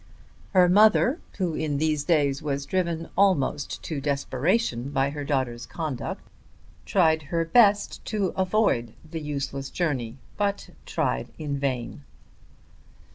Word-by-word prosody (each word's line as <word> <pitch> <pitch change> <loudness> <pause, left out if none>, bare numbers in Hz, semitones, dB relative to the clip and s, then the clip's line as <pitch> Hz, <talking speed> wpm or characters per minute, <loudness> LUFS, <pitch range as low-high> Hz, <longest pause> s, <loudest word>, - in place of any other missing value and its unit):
Her 180 -2 +6
mother, 215 - +5 0.2
who 180 -4 -1
in 155 -2 -1
these 155 -1 +1
days 145 -5 +2
was 140 -2 -2
driven 170 -2 -1
almost 185 -7 +1
to 150 -4 -4
desperation 140 - 0
by 140 -1 +1
her 145 0 -5
daughter's 130 -4 -2
conduct, 155 -7 -5 0.6
tried 160 -4 +3
her 165 -1 0
best 205 +2 +3
to 205 -4 -1
prevent 185 - +1 0.2
the 165 -2 -4
useless 140 -2 -4
journey, 130 -9 -2 0.2
but 200 -1 -1 0.2
tried 60 0 -1
in 145 -3 -3
vain. 130 -1 -3
150 Hz, 125 wpm, -26 LUFS, 140-185 Hz, 0.6 s, Her